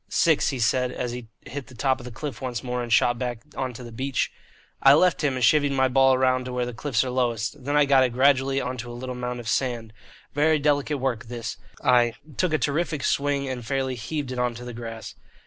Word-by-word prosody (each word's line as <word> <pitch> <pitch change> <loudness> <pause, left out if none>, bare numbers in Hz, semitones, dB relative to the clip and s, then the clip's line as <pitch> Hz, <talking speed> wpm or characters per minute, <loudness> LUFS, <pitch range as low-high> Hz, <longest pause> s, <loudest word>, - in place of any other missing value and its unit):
"Six," 160 -3 +3
he 135 - -3
said, 125 +2 +1
as 125 - -3
he 120 -1 -7
hit 140 -1 -7
the 130 - -14
top 130 +3 +1
of 125 - -10
the 125 - -7
cliff 120 -1 -6
once 125 -3 -3
more, 125 -1 -2
and 120 -1 -5
shot 120 +1 +3
back 120 -3 -3
on 130 -1 -2
to 125 - -9
the 120 - -9
beach. 130 +3 -1 0.5
I 135 +1 +8
left 180 +1 +3
him 140 -3 +1
and 130 - -2
chivied 145 +4 +4
my 130 -1 +3
ball 135 0 +4
round 130 0 +2
to 125 - -5
where 125 0 0
the 125 - -5
cliffs 120 0 0
are 130 - -3
lowest; 120 -2 -1
then 145 +1 0
I 150 - +5
got 135 -1 +5
it 130 - +2
gradually 135 +1 +3
on 125 0 -3
to 120 0 -6
a 120 - -7
little 130 +1 -5
mound 125 0 -4
of 120 - -8
sand 120 -3 -1 0.4
(very 155 +2 +3
delicate 145 0 +1
work, 130 -4 -2
this), 115 0 -5 0.8
took 185 -3 +1
a 155 - +3
terrific 150 +1 -1
swing 140 0 0
and 130 -2 -4
fairly 135 +1 -1
heaved 130 +3 -4
it 125 - -4
on 125 -1 0
to 120 +1 -8
the 120 - -6
grass. 115 -1 -7
130 Hz, 240 wpm, -25 LUFS, 120-140 Hz, 0.8 s, I